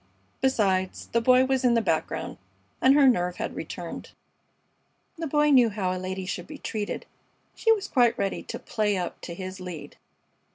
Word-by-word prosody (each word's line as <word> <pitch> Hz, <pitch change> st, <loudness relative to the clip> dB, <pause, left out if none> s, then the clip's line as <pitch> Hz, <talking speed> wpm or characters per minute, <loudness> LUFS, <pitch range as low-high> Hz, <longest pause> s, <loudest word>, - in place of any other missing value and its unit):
Besides, 195 Hz, -8 st, +1 dB
the 235 Hz, -, +2 dB
Boy 255 Hz, +2 st, +5 dB
was 265 Hz, 0 st, 0 dB
in 245 Hz, -2 st, +4 dB
the -, -, +4 dB
background, -, -, -2 dB, 0.4 s
and 265 Hz, +1 st, +6 dB
her 285 Hz, -2 st, +6 dB
nerve 180 Hz, -8 st, +2 dB
had -, -, -4 dB
returned. -, -, -7 dB, 1.1 s
The 330 Hz, -, -2 dB
Boy 295 Hz, +1 st, +3 dB
knew 250 Hz, -4 st, +6 dB
how 195 Hz, -3 st, -2 dB
a 180 Hz, -, -5 dB
lady 185 Hz, 0 st, -4 dB
should 185 Hz, -, -5 dB
be 300 Hz, -, -9 dB
treated. 210 Hz, -6 st, -4 dB, 0.5 s
She 450 Hz, -, +2 dB
was 415 Hz, -3 st, +1 dB
quite 240 Hz, -3 st, +3 dB
ready 195 Hz, -, -1 dB
to -, -, -6 dB
"play 210 Hz, -3 st, -1 dB
up" 180 Hz, -1 st, -4 dB
to 170 Hz, -, -7 dB
his 185 Hz, +1 st, -7 dB
lead. 180 Hz, -4 st, -8 dB
220 Hz, 175 wpm, -26 LUFS, 185-265 Hz, 1.1 s, and